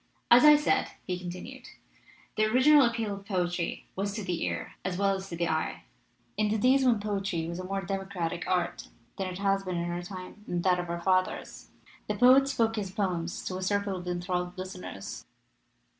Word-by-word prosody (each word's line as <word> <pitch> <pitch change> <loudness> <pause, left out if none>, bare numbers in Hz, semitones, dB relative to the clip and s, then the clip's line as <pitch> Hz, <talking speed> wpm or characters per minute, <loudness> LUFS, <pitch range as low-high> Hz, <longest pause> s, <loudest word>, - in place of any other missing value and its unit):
"As 240 +1 +9
I 300 0 +9
said," 295 +1 +2 0.2
he 180 -1 -3
continued, 180 0 -8 0.7
"the 215 - +3
original 260 +7 +6
appeal 230 -4 0
of 200 0 -8
poetry 180 -3 -1
was 200 +1 -2
to 215 - -4
the 180 -2 -2
ear - - -3
as 180 -1 -2
well 200 0 +2
as 190 0 -5
to 170 - -5
the 170 0 0
eye. 160 0 -2 0.5
In 215 0 +2
the 220 - +1
days 260 +4 +4
when 240 -4 +4
poetry 195 -5 -2
was 170 +1 -5
a - - -4
more 195 +1 -3
democratic 185 -2 -3
art 180 -2 -1 0.3
than 190 - -2
it 180 -1 -5
has 195 0 +1
been 185 -2 -3
in 170 0 -2
our 175 0 -3
time 185 +3 -9
and 175 -1 -2
that 180 -1 +3
of 175 -1 -4
our 170 0 -3
fathers, 185 0 0 0.4
the - - -1
poet 260 +2 +6
spoke 230 -5 +1
his 200 -3 -2
poems 185 -4 -2
to 185 - -3
a - - -5
circle 200 +1 0
of 180 -1 -7
enthralled 180 0 -2
listeners. 185 - -7
190 Hz, 200 wpm, -29 LUFS, 180-210 Hz, 0.7 s, As